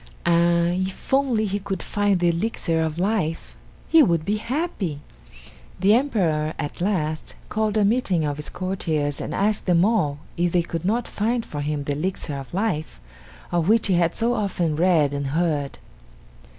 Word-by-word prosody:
Ah 170 0 +3
if 185 +6 -3
only 260 -5 +2
he 200 0 -1
could 195 -2 -4
find 205 -2 +1
the 175 0 +3
Elixir 170 -2 -1
of 160 0 -2
Life, 180 -4 -1 0.3
he 325 - +6
would 170 - +2
be 210 +1 0
happy. 225 - -3 0.8
The 195 +3 +5
Emperor 175 - +1
at 145 - -5
last 160 -5 -1
called 215 0 0
a 210 - +4
meeting 200 -7 +1
of 145 -1 -2
his 150 - -4
courtiers 160 -6 -2
and - - -4
asked 205 +1 0
them 175 0 +4
all 190 -11 +1 0.2
if 175 0 +1
they 175 -1 +3
could 165 0 -5
not 225 +5 0
find 230 +3 -1
for 145 - -5
him 145 0 -2
the 145 - -2
Elixir 155 0 -3
of 135 -2 -8
Life 170 - -2 0.5
of 175 +1 +1
which 225 0 +4
he 190 - +2
had 170 -1 +2
so 235 +2 +1
often 180 -8 -1
read 160 -4 +3
and 140 -1 -2
heard. 150 -5 0
175 Hz, 175 wpm, -23 LUFS, 155-210 Hz, 0.8 s, he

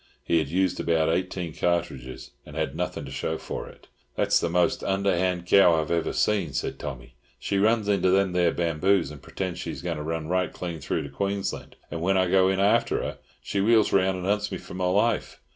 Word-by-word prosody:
He 85 - +2
had 80 - -1
used 90 +3 0
about 80 -1 +2
eighteen 90 -1 -2
cartridges, 70 -8 -2
and - - -12
had - - -2
nothing - - -3
to - - -9
show - - -2
for - - -6
it. - - -18 0.3
"That's - - +3
the 85 - -1
most 90 +1 +1
underhand 95 -2 0
cow 90 -3 +5
ever 80 +1 0
I - - -2
seen!" 95 -9 0
said 65 - -3
Tommy. 65 -3 -7 0.2
"She 100 - -1
runs 110 +1 +2
into 100 -2 +2
them 95 0 +3
there 90 -1 +2
bamboos 85 0 +1
and 75 -3 -11
pretends 95 -2 -5
she's - - -6
going 85 -2 -2
to 75 - -5
run 80 0 -3
right 90 +1 0
clean 85 -3 -5
through 70 - -2
to 70 - -7
Queensland, 100 +7 -3 0.2
and 80 - -4
when 95 +3 +2
I 95 -1 +2
go 95 -1 +5
in 95 0 0
after 100 +1 +2
her, - - -5 0.2
she 100 - -1
wheels 110 +1 +4
round 95 -1 +3
and 90 - -5
hunts 105 +1 0
me 95 - -3
for - - -11
my 90 0 -2
life. 105 +5 +1
90 Hz, 215 wpm, -26 LUFS, 80-95 Hz, 0.3 s, cow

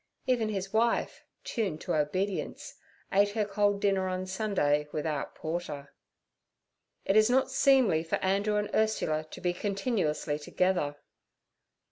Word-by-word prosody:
Even 240 -4 +1
his 195 -1 -4
wife—tuned 220 -4 -1
to - - -2
obedience—ate 190 +4 -1
her 215 -1 0
cold 205 0 +1
dinner 195 -2 +1
on 185 0 -2
Sunday 185 -7 0
without 150 -1 -3
porter. 155 -4 -5 1.1
'It 195 - +2
is 215 +1 +6
not 265 +1 +2
seemly 265 - +4
for 165 - -1
Andrew 200 +2 0
and 210 0 -1
Ursula 185 -8 +1
to - - -11
be 175 -1 0
continuously 195 - -1
together.' 175 -1 0
195 Hz, 120 wpm, -29 LUFS, 160-215 Hz, 1.1 s, is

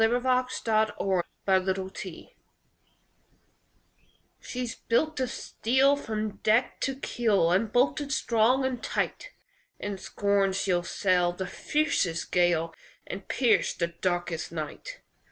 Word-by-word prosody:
THE 225 - +5
WORD 245 +2 0 0.4
OF 215 -4 +1 0.2
AN 190 -1 +3
ENGINEER 190 0 -5 2.1
"She's 245 -2 -4
built 310 +6 0
of 255 -1 0
steel 265 +5 +2
From 215 -6 -4
deck 225 +4 +2
to 270 - 0
keel, 215 -10 +1
And 205 +4 +2
bolted 280 +4 +1
strong 245 +2 +2
and 255 -2 -2
tight; - - -2 0.5
In 205 -2 -5
scorn 200 -1 +1
she'll 185 -2 +1
sail 180 0 +1
The 190 +1 -4
fiercest 200 - -1
gale, 175 -2 +2 0.3
And 195 0 -7
pierce 245 -3 +2
the 170 -1 -1
darkest 175 -1 -2
night. 155 -3 -6
205 Hz, 120 wpm, -28 LUFS, 180-245 Hz, 2.1 s, THE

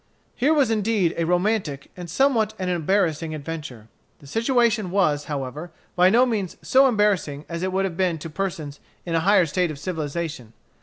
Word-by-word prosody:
Here 275 +5 +2
was 285 -7 +3
indeed 210 -5 +1
a 165 - -1
romantic 180 -6 0
and 175 -2 -8
somewhat 235 - +2
an 185 -1 -2
embarrassing 165 -2 0
adventure. 150 -7 -7 0.3
The - - -18
situation 230 - +1
was, 150 -6 +1
however, 145 +3 -5 0.3
by 180 0 +5
no 240 +5 +5
means 210 -7 -2
so 270 +1 +5
embarrassing 200 - 0
as 170 0 -5
it 185 0 -1
would 190 +1 0
have 175 -3 -4
been 180 -3 +1
to 160 +2 -7
persons 155 -5 -4 0.3
in 170 - -3
a 165 - +3
higher 190 +1 +4
state 175 +2 0
of 155 - -6
civilization. 155 - -4
180 Hz, 175 wpm, -23 LUFS, 155-210 Hz, 0.3 s, by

